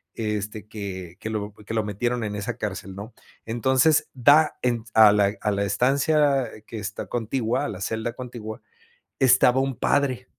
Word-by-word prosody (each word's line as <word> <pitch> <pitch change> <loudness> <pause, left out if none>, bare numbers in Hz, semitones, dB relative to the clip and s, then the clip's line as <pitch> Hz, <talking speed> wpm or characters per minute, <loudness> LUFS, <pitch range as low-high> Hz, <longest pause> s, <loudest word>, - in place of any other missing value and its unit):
este, 105 -1 -4
que 95 -5 -7
que 110 - -5
lo 105 -1 -4
que 105 +1 -9
lo 110 - +1
metieron 120 +4 -2
en 105 -1 -3
esa 110 +3 -4
cárcel, 100 -3 -5
¿no? 105 +4 -9 0.3
Entonces 130 +7 +2
da 145 +5 +5
en 120 -2 +1
s 115 - -18
a 110 -2 +8
la 100 0 +2
a 105 - 0
la 100 0 0
estancia 135 +4 +2 0.2
que 115 - -6
está 105 +1 -5
contigua, 120 +3 -1
a - - -3
la 95 - -7
celda 110 +3 -2
contigua, 120 -3 -8 0.6
estaba 130 -1 +5
un 135 -2 -1
padre 130 -3 +1
115 Hz, 175 wpm, -24 LUFS, 105-130 Hz, 0.6 s, a